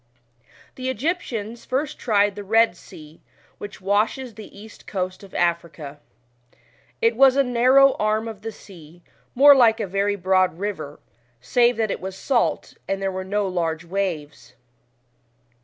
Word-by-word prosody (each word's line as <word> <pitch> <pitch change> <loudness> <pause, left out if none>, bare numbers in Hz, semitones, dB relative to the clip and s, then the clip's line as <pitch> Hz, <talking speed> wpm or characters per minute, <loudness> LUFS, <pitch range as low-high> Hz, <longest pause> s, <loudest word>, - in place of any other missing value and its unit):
The 260 0 -4
Egyptians 240 - -3
first 280 +4 -3
tried 205 -3 +2
the 205 - -6
lied 225 0 +2
Sea, 155 -2 -15 0.4
which 205 -2 -9
washes 215 +6 0
the 215 0 -11
east 220 +1 -14
coast 185 -2 -4
of 195 - -14
Africa. 170 -4 -2 1.0
It 230 0 +3
was 265 +1 +5
a 275 - +4
narrow 260 +2 +4
arm 215 +1 0
of 220 -3 -8
the 225 +1 -5
sea, 175 -5 -16 0.3
more 285 +3 +8
like 230 -4 +4
a - - -1
very 200 +2 -1
broad 185 -2 +1
river, 175 -7 -5 0.4
save 240 - +2
that 220 -3 0
it - - -4
was 190 0 -6
salt, 250 +1 -1
and 195 - -2
there 195 0 -2
were 185 0 -5
no 200 +1 -1
large 165 -3 -2
waves. 170 -5 -4
205 Hz, 150 wpm, -22 LUFS, 185-235 Hz, 1.0 s, more